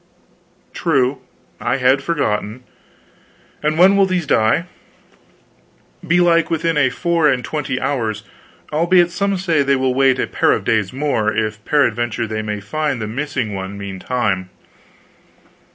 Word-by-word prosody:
"True. 130 Hz, +1 st, +1 dB, 0.4 s
I -, -, 0 dB
had 135 Hz, +1 st, +3 dB
forgotten. 125 Hz, -7 st, -2 dB, 1.0 s
And 155 Hz, +1 st, 0 dB
when 190 Hz, +3 st, +6 dB
will 195 Hz, -1 st, +4 dB
these 180 Hz, -3 st, -1 dB
die?" 110 Hz, +6 st, +2 dB, 1.4 s
"Belike 170 Hz, -1 st, +3 dB
within 165 Hz, 0 st, 0 dB
a 145 Hz, -3 st, +3 dB
four 170 Hz, +3 st, +1 dB
and 125 Hz, -2 st, 0 dB
twenty 145 Hz, -4 st, -3 dB
hours; 110 Hz, -7 st, -2 dB, 0.5 s
albeit 175 Hz, +2 st, +3 dB
some 200 Hz, +2 st, -1 dB
say 170 Hz, -5 st, +1 dB
they 140 Hz, 0 st, +2 dB
will 130 Hz, -1 st, 0 dB
wait 135 Hz, 0 st, +3 dB
a -, -, 0 dB
pair -, -, +1 dB
of -, -, -2 dB
days 105 Hz, -4 st, +1 dB
more, 130 Hz, -6 st, 0 dB
if 110 Hz, 0 st, -2 dB
peradventure 120 Hz, -6 st, +1 dB
they 110 Hz, 0 st, -3 dB
may 105 Hz, -1 st, -4 dB
find 145 Hz, +6 st, -2 dB
the 110 Hz, -, -3 dB
missing 125 Hz, -1 st, -3 dB
one 95 Hz, +1 st, -6 dB
meantime." 100 Hz, -1 st, -2 dB
135 Hz, 135 wpm, -18 LUFS, 110-160 Hz, 1.4 s, when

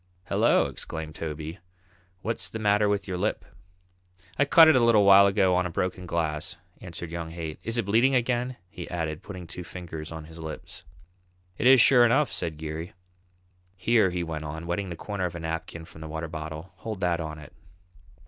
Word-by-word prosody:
"Hello!" -, -, +4 dB
exclaimed 80 Hz, -1 st, -6 dB
Toby, 80 Hz, +2 st, -6 dB, 0.6 s
"what's 115 Hz, +1 st, -3 dB
the -, -, -5 dB
matter 105 Hz, -1 st, +3 dB
with 100 Hz, -1 st, -1 dB
your 90 Hz, -2 st, -3 dB
lip?" -, -, -1 dB, 0.9 s
"I 145 Hz, -, +5 dB
cut 160 Hz, +3 st, +8 dB
it 160 Hz, -, +6 dB
a -, -, +6 dB
little 110 Hz, -3 st, +5 dB
while 100 Hz, 0 st, +8 dB
ago 95 Hz, -2 st, +3 dB
on 90 Hz, 0 st, +2 dB
a -, -, -7 dB
broken 90 Hz, +1 st, -3 dB
glass," 85 Hz, -1 st, -2 dB, 0.3 s
answered 85 Hz, -3 st, -7 dB
young 85 Hz, -1 st, -4 dB
Haight. 80 Hz, -2 st, -6 dB
"Is 115 Hz, +1 st, -3 dB
it 115 Hz, -, 0 dB
bleeding 120 Hz, +6 st, +3 dB
again?" 125 Hz, +1 st, 0 dB
he 90 Hz, -1 st, -9 dB
added, 80 Hz, -3 st, -3 dB
putting 95 Hz, -3 st, -8 dB
two 90 Hz, +2 st, -8 dB
fingers 80 Hz, -3 st, -8 dB
on 80 Hz, -1 st, -7 dB
his 80 Hz, +1 st, -12 dB
lips. 80 Hz, -1 st, -8 dB, 0.8 s
"It 125 Hz, -, +3 dB
is 130 Hz, 0 st, +8 dB
sure 125 Hz, +1 st, +7 dB
enough," 120 Hz, +1 st, +3 dB
said 80 Hz, -2 st, -3 dB
Geary. 80 Hz, +2 st, -6 dB, 0.8 s
"Here," 110 Hz, +1 st, +3 dB
he 90 Hz, -1 st, -2 dB
went 80 Hz, -2 st, -5 dB
on, 80 Hz, +2 st, -6 dB
wetting 90 Hz, +3 st, -2 dB
the 85 Hz, -, -5 dB
corner 100 Hz, +2 st, -3 dB
of 85 Hz, -, -4 dB
a -, -, -5 dB
napkin 80 Hz, 0 st, -5 dB
from 80 Hz, -, -14 dB
the 80 Hz, -, -6 dB
water 80 Hz, +1 st, -4 dB
bottle, 80 Hz, +2 st, -7 dB
"hold 110 Hz, +1 st, -6 dB
that 90 Hz, -2 st, +1 dB
on 80 Hz, -1 st, -5 dB
it." 75 Hz, -2 st, -12 dB
90 Hz, 195 wpm, -27 LUFS, 80-105 Hz, 0.9 s, cut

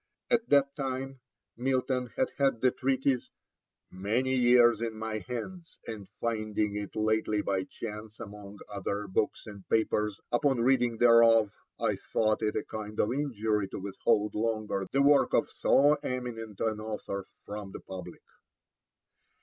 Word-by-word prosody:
At 235 Hz, -1 st, +2 dB
that 140 Hz, -1 st, +4 dB
time 135 Hz, -1 st, -4 dB, 0.4 s
Milton 130 Hz, 0 st, 0 dB
had 260 Hz, -1 st, +1 dB
had 135 Hz, -5 st, +2 dB
the 130 Hz, -, +4 dB
treatise 130 Hz, -1 st, 0 dB, 0.6 s
'many 110 Hz, +8 st, 0 dB
years 120 Hz, -2 st, +5 dB
in 115 Hz, -2 st, -3 dB
my 110 Hz, 0 st, -3 dB
hands, 165 Hz, -, -7 dB
and 105 Hz, -4 st, -7 dB
finding 110 Hz, -2 st, -1 dB
it 105 Hz, -1 st, -5 dB
lately 110 Hz, -1 st, +1 dB
by 95 Hz, -1 st, -1 dB
chance 105 Hz, -1 st, -8 dB
among 105 Hz, -2 st, -9 dB
other 100 Hz, 0 st, -3 dB
books 95 Hz, +2 st, -1 dB
and 100 Hz, -3 st, -10 dB
papers, 105 Hz, -2 st, +1 dB
upon 130 Hz, 0 st, +2 dB
reading 120 Hz, -2 st, +2 dB
thereof 115 Hz, -2 st, +6 dB, 0.3 s
I -, -, 0 dB
thought 110 Hz, 0 st, 0 dB
it 105 Hz, -1 st, 0 dB
a -, -, -1 dB
kind 105 Hz, -1 st, -7 dB
of 105 Hz, -, +2 dB
injury 110 Hz, -7 st, -1 dB
to -, -, -7 dB
withhold 105 Hz, +2 st, 0 dB
longer 110 Hz, -3 st, -1 dB
the 140 Hz, +1 st, +3 dB
work 145 Hz, 0 st, +5 dB
of -, -, +1 dB
so 145 Hz, +2 st, +4 dB
eminent 120 Hz, -6 st, -5 dB
an 110 Hz, -1 st, 0 dB
author 105 Hz, -3 st, -5 dB, 0.2 s
from 105 Hz, -1 st, -6 dB
the -, -, -8 dB
public.' 90 Hz, -2 st, -9 dB
110 Hz, 145 wpm, -29 LUFS, 105-130 Hz, 0.6 s, thereof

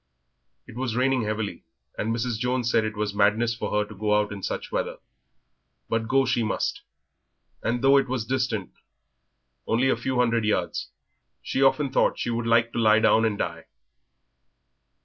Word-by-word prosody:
It -, -, -13 dB
was 125 Hz, -2 st, -2 dB
raining 130 Hz, -2 st, +1 dB
heavily, 105 Hz, -1 st, -3 dB, 0.3 s
and 105 Hz, -, -2 dB
Mrs. 115 Hz, 0 st, -2 dB
Jones 125 Hz, -1 st, 0 dB
said 115 Hz, -, +3 dB
it 110 Hz, -1 st, -4 dB
was 105 Hz, -1 st, -2 dB
madness 105 Hz, +3 st, +2 dB
for -, -, -4 dB
her 105 Hz, 0 st, 0 dB
to 105 Hz, -, -10 dB
go 105 Hz, +1 st, 0 dB
out 105 Hz, -1 st, -2 dB
in 100 Hz, -1 st, -6 dB
such -, -, -4 dB
weather, -, -, -2 dB, 0.9 s
but 115 Hz, -1 st, -1 dB
go 135 Hz, +2 st, +3 dB
she 120 Hz, -1 st, +1 dB
must; 110 Hz, -, -2 dB, 0.8 s
and 120 Hz, +2 st, -1 dB
though 135 Hz, +1 st, +6 dB
it 135 Hz, -, +1 dB
was 125 Hz, -3 st, -2 dB
distant 120 Hz, -6 st, -2 dB, 1.0 s
only 125 Hz, +4 st, +2 dB
a -, -, +3 dB
few 130 Hz, -1 st, -3 dB
hundred 115 Hz, -2 st, +2 dB
yards, 105 Hz, 0 st, -1 dB, 0.5 s
she 135 Hz, -, -2 dB
often 135 Hz, 0 st, +3 dB
thought -, -, +2 dB
she 120 Hz, -, -2 dB
would 115 Hz, 0 st, -2 dB
like 115 Hz, 0 st, +3 dB
to -, -, -2 dB
lie 110 Hz, -1 st, +5 dB
down 110 Hz, 0 st, +4 dB
and 105 Hz, -2 st, 0 dB
die. 85 Hz, -3 st, -4 dB
115 Hz, 175 wpm, -25 LUFS, 110-125 Hz, 1.0 s, though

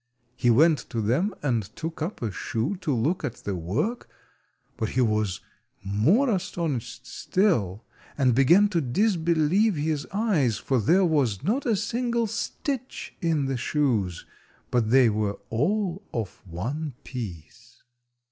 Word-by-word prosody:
He 120 Hz, -, +1 dB
went 150 Hz, +5 st, +5 dB
to 115 Hz, -, -3 dB
them 130 Hz, -, +1 dB
and 120 Hz, -6 st, +1 dB
took 160 Hz, 0 st, -6 dB
up 165 Hz, -, -3 dB
a 110 Hz, -, -1 dB
shoe 115 Hz, -, -2 dB
to 160 Hz, -, -2 dB
look 140 Hz, +9 st, 0 dB
at 120 Hz, -, -3 dB
the 100 Hz, -, -2 dB
work, 125 Hz, -, -2 dB, 0.7 s
but 110 Hz, -, -2 dB
he 130 Hz, -, +1 dB
was 105 Hz, -5 st, 0 dB, 0.4 s
more 115 Hz, -, +3 dB
astonished 170 Hz, -, -3 dB
still, 115 Hz, -, 0 dB, 0.3 s
and 130 Hz, -3 st, +3 dB
began 170 Hz, -, +5 dB
to 170 Hz, -4 st, +1 dB
disbelieve 170 Hz, -, +2 dB
his 150 Hz, -1 st, -1 dB
eyes, 185 Hz, -, +1 dB
for 130 Hz, -2 st, 0 dB
there 180 Hz, -, +4 dB
was 135 Hz, -, +1 dB
not 250 Hz, +7 st, 0 dB
a 225 Hz, -, +3 dB
single 235 Hz, +2 st, 0 dB
stitch 250 Hz, +4 st, -4 dB
in 160 Hz, -5 st, +1 dB
the 135 Hz, -1 st, -1 dB
shoes, 120 Hz, -, 0 dB, 0.5 s
but 120 Hz, -3 st, +1 dB
they 130 Hz, 0 st, +6 dB
were 105 Hz, -2 st, 0 dB
all 185 Hz, -, 0 dB
of 110 Hz, -5 st, -4 dB
one 130 Hz, -, -4 dB
piece. 115 Hz, -, -9 dB
145 Hz, 140 wpm, -26 LUFS, 115-185 Hz, 0.7 s, they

